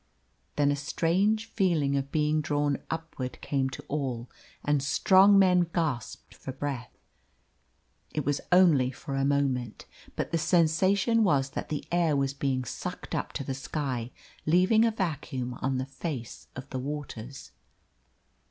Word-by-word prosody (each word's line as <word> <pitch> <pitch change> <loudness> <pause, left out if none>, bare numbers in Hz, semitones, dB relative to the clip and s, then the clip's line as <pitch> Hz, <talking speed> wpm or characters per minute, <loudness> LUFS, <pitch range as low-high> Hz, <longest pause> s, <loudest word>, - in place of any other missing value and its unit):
Then 145 -1 +3
a - - +1
strange 185 +9 +1
feeling 170 -11 +1
of 140 0 -2
being 155 0 +2
drawn 145 -1 0
upward 160 -6 -5
came 135 -2 -1
to 130 - -8
all, 130 -5 -3 0.3
and 145 -1 +2
strong 190 +7 +5
men 180 -3 +5
gasped 150 -9 -2
for 135 - -7
breath. 135 -2 -5 1.1
It 150 - -3
was 145 -1 0
only 165 -8 +5
for 135 +2 -6
a 135 - +1
moment. 135 -5 0 0.3
But - - -3
the 165 - +1
sensation 185 +7 +3
was 140 -8 +2
that - - -5
the 150 - -3
air 170 -3 +2
was 135 -1 0
being 135 -2 -1
sucked - - -6
up - - -2
to - - -3
the 135 - -3
sky, 130 -3 -3 0.4
leaving 185 +7 +5
a - - +4
vacuum 150 - -3
on 130 0 0
the 130 - -2
face 135 -3 -6
of 130 +1 -7
the 130 - -2
waters. 135 -2 -6
145 Hz, 150 wpm, -28 LUFS, 135-170 Hz, 1.1 s, strong